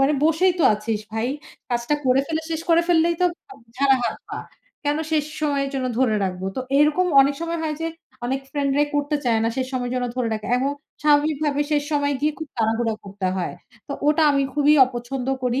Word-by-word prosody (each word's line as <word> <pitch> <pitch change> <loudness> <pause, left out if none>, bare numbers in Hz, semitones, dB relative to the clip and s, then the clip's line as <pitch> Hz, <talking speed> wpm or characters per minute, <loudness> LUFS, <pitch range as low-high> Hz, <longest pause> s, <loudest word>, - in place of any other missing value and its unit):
মানে 270 +2 +4
বসেই 325 +4 +3
তো - - +2
আছিস 210 0 -3
ভাই। 225 +2 -1 0.4
কাজটা 240 +4 0
করে 255 +1 +4
ফেলে 320 +1 -2
শেষ 320 -1 -2
করে 335 0 +5
ফেললেই 335 0 +3
তো - - +4 0.3
আব - - -14 0.2
ঝাড়া 270 0 +4
হাত - - -1
পা। - - -5 0.5
কেন 290 +1 +1
শেষ 305 -2 +2 0.2
সময়ের 285 -2 0
জন্য 260 -1 -1
ধরে 250 -4 +3
রাখবো? 185 0 -3
তো - - -1 0.2
এরকম 300 +5 +3
অনেক 275 +1 +3
সময় 335 0 -2
হয় 310 -1 -1
যে 325 - -1 0.4
অনেক 265 +2 -1
ফ্রেন্ড 285 -2 0
রাই 295 0 +3
করতে 290 +1 0
চায় 230 -2 +2
না। - - +2
শেষ 260 -1 -1
সময় 250 -1 -2
যেন 250 - -1
ধরে 250 -2 0
রাখে 215 0 -5
এবং 270 +2 0 0.3
স্বাভাবিক 300 0 +3
ভাবে 290 -1 0
শেষ 295 -1 +2
সময় 285 -1 +1
গিয়ে 300 +1 +1
খুব 315 -2 -6
তাড়াহুড়া 225 0 +1
করতে 195 -1 -4
হয়। 180 - -3 0.3
তো - - -3 0.2
ওটা 305 +1 +3
আমি 280 -1 +2
খুবই 295 +1 +4
অপছন্দ 250 +1 -5 0.2
করি 250 +2 +1
280 Hz, 210 wpm, -23 LUFS, 245-300 Hz, 0.5 s, করে